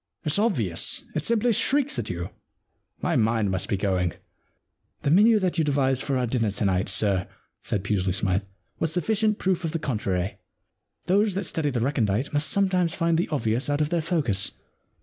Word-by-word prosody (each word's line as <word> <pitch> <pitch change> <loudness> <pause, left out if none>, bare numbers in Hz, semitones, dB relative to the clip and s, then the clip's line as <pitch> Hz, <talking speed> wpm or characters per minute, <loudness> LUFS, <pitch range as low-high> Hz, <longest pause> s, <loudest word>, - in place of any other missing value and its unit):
It's 155 +5 +2
obvious. 120 - +1
It 155 - -2
simply 230 +4 +2
shrieks 285 +6 +1
at - - -4
you. 90 0 -4 0.7
My - - +1
mind 110 -2 +2
must 95 -2 -2
be 100 - +1
going.' 95 -3 0 0.4
* - - -49
The 140 - +1
menu 215 +6 +6
that 185 -4 0
you - - +3
devised 135 -3 +1
for 135 -1 -1
our 125 - +1
dinner 115 -2 0
to 100 +2 -2
night, 95 0 +1
sir,' 95 -4 +1 0.3
said 100 - -2
Pusely 95 -2 0
Smythe, 95 +1 +1 0.2
* - - -42
was 160 - 0
suffi 180 +4 0
cient 215 0 +1
proof 185 -1 0
of 165 -1 -2
the - - +1
contrary. 100 - -2 0.7
Those 200 +1 +2
that 195 - -1
study 160 -3 -1
the 125 -4 -2
recondite 120 -2 0
must 145 +1 +2
sometimes 185 -4 +2
find 165 0 +1
the 170 - 0
obvious 120 -2 0
out 145 0 +1
of 150 -1 +1
their 170 -1 0
focus.' 135 - 0
140 Hz, 195 wpm, -25 LUFS, -, 0.7 s, menu